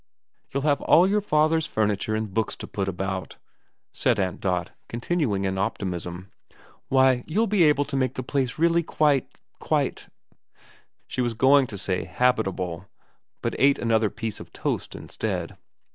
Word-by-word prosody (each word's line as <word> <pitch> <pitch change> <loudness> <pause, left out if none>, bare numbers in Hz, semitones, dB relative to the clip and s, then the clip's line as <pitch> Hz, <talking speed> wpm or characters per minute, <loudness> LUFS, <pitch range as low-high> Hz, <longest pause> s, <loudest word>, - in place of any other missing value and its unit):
' - - -47
You'll 140 0 -2
have 145 -1 +2
all 170 +3 +6
your 210 +2 +2
father's 155 -3 +2
furniture 105 0 0
and 110 -3 -3
books 110 +1 -1
to - - -8
put 100 -2 -3
about,' 95 0 -4 0.5
said - - +1
Aunt 95 -2 -2
Dot, 90 -2 -1 0.2
continuing 120 - -1
in 95 0 -1
optimism. 90 -3 -4 0.6
*Why, 130 -2 +4
you'll 215 +8 +1
be 210 -3 +1
able 145 -1 +3
to - - -5
make 130 -1 0
the 130 - -3
place 130 -1 -1
really 170 +1 +3
quite 150 -4 +1 0.3
quite - - -1 0.5
' - - -30
She 130 - -2
was 120 -2 -1
going 135 +3 +5
to 105 - -7
say 95 -1 -2
habitable, 95 -4 0 0.6
but - - -1
ate 140 +1 +5
another 110 -2 +2
piece 110 0 -5
of - - -11
toast - - -3
instead. - - -4
120 Hz, 160 wpm, -25 LUFS, 95-145 Hz, 0.6 s, all